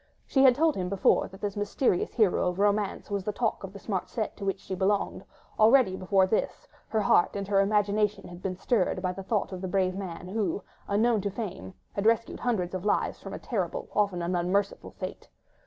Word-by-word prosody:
She 270 Hz, -, +2 dB
had 260 Hz, -2 st, +7 dB
told 315 Hz, +2 st, +2 dB
him 180 Hz, -1 st, -2 dB
before 200 Hz, -1 st, +3 dB
that 190 Hz, -, -14 dB
this 205 Hz, -1 st, -2 dB
mysterious 205 Hz, 0 st, 0 dB
hero 215 Hz, -6 st, +3 dB
of 180 Hz, -, -5 dB
romance 205 Hz, +1 st, 0 dB
was 200 Hz, -1 st, -1 dB
the 210 Hz, -, -1 dB
talk 220 Hz, 0 st, -1 dB
of 195 Hz, -, -6 dB
the 200 Hz, -, -10 dB
smart 190 Hz, -2 st, -3 dB
set 215 Hz, +2 st, -3 dB
to -, -, -7 dB
which 195 Hz, 0 st, -1 dB
she -, -, -7 dB
belonged; 195 Hz, +2 st, 0 dB, 0.4 s
already, 220 Hz, -2 st, +5 dB
before 190 Hz, 0 st, +3 dB
this, 220 Hz, -, -2 dB, 0.2 s
her 220 Hz, -, 0 dB
heart 195 Hz, -2 st, +3 dB
and 200 Hz, -1 st, -3 dB
her 200 Hz, -1 st, +3 dB
imagination 210 Hz, +1 st, +1 dB
had 175 Hz, 0 st, -11 dB
been 185 Hz, -1 st, -3 dB
stirred 190 Hz, -3 st, +1 dB
by 185 Hz, -, +1 dB
the 190 Hz, +2 st, -7 dB
thought 200 Hz, +1 st, -1 dB
of 185 Hz, -1 st, -6 dB
the 190 Hz, -, -3 dB
brave 185 Hz, 0 st, +1 dB
man, 180 Hz, -2 st, -6 dB
who, 200 Hz, -2 st, -1 dB, 0.2 s
unknown 220 Hz, +2 st, +2 dB
to 200 Hz, -, -1 dB
fame, 190 Hz, -2 st, -6 dB, 0.2 s
had 200 Hz, +2 st, 0 dB
rescued 230 Hz, 0 st, +1 dB
hundreds 195 Hz, -8 st, -1 dB
of 185 Hz, -1 st, -3 dB
lives 210 Hz, -, 0 dB
from -, -, -7 dB
a -, -, -4 dB
terrible, -, -, -3 dB
often 200 Hz, -4 st, +1 dB
an 175 Hz, +2 st, -1 dB
unmerciful 190 Hz, +3 st, 0 dB
fate. -, -, -8 dB
200 Hz, 215 wpm, -28 LUFS, 185-215 Hz, 0.4 s, had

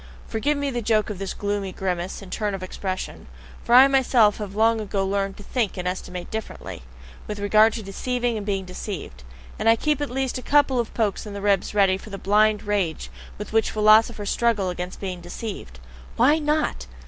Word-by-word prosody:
Forgive 280 Hz, +7 st, 0 dB
me 285 Hz, -1 st, -1 dB
the 240 Hz, -1 st, -2 dB
joke 215 Hz, -1 st, +1 dB
of 195 Hz, -, -7 dB
this 195 Hz, -1 st, -4 dB
gloomy 205 Hz, -1 st, -2 dB
grimace 185 Hz, 0 st, -3 dB
and 185 Hz, -, -12 dB
turn 210 Hz, -3 st, -1 dB
of 190 Hz, -, -7 dB
expression; 185 Hz, 0 st, -5 dB, 0.4 s
for 235 Hz, -, +3 dB
I 260 Hz, +2 st, +9 dB
myself 250 Hz, -6 st, +4 dB
have 205 Hz, -2 st, -6 dB
long 225 Hz, +1 st, +3 dB
ago 195 Hz, -2 st, -1 dB
learned 195 Hz, 0 st, -1 dB
to 205 Hz, -, -11 dB
think 225 Hz, -3 st, -1 dB
and 180 Hz, 0 st, -3 dB
estimate 180 Hz, -1 st, -5 dB
differently 220 Hz, -, -6 dB, 0.5 s
with 210 Hz, -, -4 dB
regard 215 Hz, +2 st, +4 dB
to 225 Hz, -, -5 dB
deceiving 240 Hz, +4 st, -2 dB
and 215 Hz, -, -4 dB
being 195 Hz, -2 st, -2 dB
deceived, 180 Hz, -, -7 dB, 0.4 s
and 225 Hz, -, +3 dB
I 225 Hz, -, +7 dB
keep 300 Hz, +4 st, 0 dB
at 290 Hz, -, -2 dB
least 260 Hz, 0 st, -2 dB
a -, -, -8 dB
couple 280 Hz, -2 st, +3 dB
of 235 Hz, -, -2 dB
pokes 215 Hz, -2 st, -1 dB
in 205 Hz, -, -7 dB
the -, -, -4 dB
ribs 200 Hz, 0 st, +1 dB
ready 195 Hz, -2 st, +4 dB
for 215 Hz, -, -11 dB
the 200 Hz, -, -6 dB
blind 210 Hz, +2 st, +2 dB
rage 200 Hz, -6 st, -2 dB, 0.3 s
with 210 Hz, +1 st, -7 dB
which 225 Hz, 0 st, +3 dB
philosophers 215 Hz, 0 st, +4 dB
struggle 215 Hz, -6 st, +1 dB
against 180 Hz, +1 st, -6 dB
being 185 Hz, -3 st, -5 dB
deceived. 175 Hz, -, -7 dB, 0.4 s
Why 290 Hz, +7 st, +4 dB
NOT? 300 Hz, 0 st, -1 dB
210 Hz, 200 wpm, -24 LUFS, 195-235 Hz, 0.5 s, I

